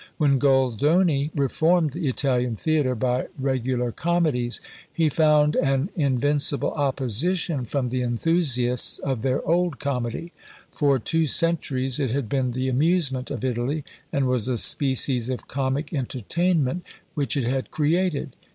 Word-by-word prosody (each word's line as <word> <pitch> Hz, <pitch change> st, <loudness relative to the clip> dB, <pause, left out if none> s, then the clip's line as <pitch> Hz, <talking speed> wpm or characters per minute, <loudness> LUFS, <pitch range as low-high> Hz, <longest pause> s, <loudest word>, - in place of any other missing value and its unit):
When 140 Hz, -4 st, +2 dB
Goldoni 140 Hz, -, +2 dB
reformed 155 Hz, +3 st, +1 dB
the 165 Hz, +2 st, -4 dB
Italian 125 Hz, -3 st, 0 dB
theatre 145 Hz, -1 st, 0 dB
by 125 Hz, +2 st, -1 dB
regular 130 Hz, -2 st, -1 dB
comedies, 155 Hz, -7 st, 0 dB, 0.3 s
he 160 Hz, -2 st, +1 dB
found 150 Hz, -1 st, +3 dB
an 135 Hz, +5 st, 0 dB
invincible 145 Hz, -1 st, +1 dB
opposition 140 Hz, -, -1 dB
from 125 Hz, +1 st, -2 dB
the 125 Hz, +1 st, -2 dB
enthusiasts 125 Hz, -1 st, +2 dB
of 135 Hz, -5 st, -3 dB
their 130 Hz, +2 st, -1 dB
old 170 Hz, -2 st, +1 dB
Comedy: 140 Hz, +5 st, -4 dB, 0.4 s
for 140 Hz, -3 st, +2 dB
two 160 Hz, +7 st, 0 dB
centuries 135 Hz, -5 st, +1 dB
it 135 Hz, -4 st, 0 dB
had 130 Hz, 0 st, -2 dB
been 130 Hz, -2 st, -1 dB
the 130 Hz, +1 st, -2 dB
amusement 135 Hz, -1 st, +1 dB
of 130 Hz, -4 st, -4 dB
Italy, 130 Hz, +5 st, -2 dB, 0.3 s
and 140 Hz, -1 st, 0 dB
was 125 Hz, -2 st, 0 dB
a 125 Hz, -2 st, -1 dB
species 130 Hz, -1 st, +2 dB
of 130 Hz, -, -5 dB
comic 135 Hz, +4 st, -2 dB
entertainment 155 Hz, -, -1 dB, 0.3 s
which 145 Hz, -2 st, -1 dB
it 135 Hz, -, 0 dB
had 130 Hz, +2 st, -2 dB
created. 155 Hz, -2 st, -1 dB
135 Hz, 135 wpm, -24 LUFS, 125-155 Hz, 0.4 s, found